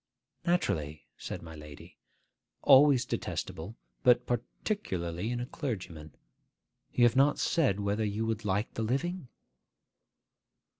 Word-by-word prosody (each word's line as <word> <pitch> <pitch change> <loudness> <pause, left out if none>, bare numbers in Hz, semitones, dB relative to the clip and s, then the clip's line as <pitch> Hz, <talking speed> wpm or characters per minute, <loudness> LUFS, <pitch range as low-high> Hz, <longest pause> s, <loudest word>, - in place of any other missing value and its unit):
'Naturally,' 80 - 0
said - - -7
my 80 -1 -9
lady. 75 -1 -12 0.7
'Always 140 -2 +7
detestable, 85 +8 -4 0.3
but 125 -1 +4
particularly 110 - -3
in 120 0 -2
a 120 - -3
clergyman. 90 - -6 0.8
You 120 - +2
have 120 0 +5
not 140 +2 +4
said 130 - +1
whether 100 +2 0
you 105 +1 -1
will 110 -1 0
like 105 +2 -1
the - - -3
living? 140 +8 -2
110 Hz, 115 wpm, -30 LUFS, 90-130 Hz, 0.8 s, Always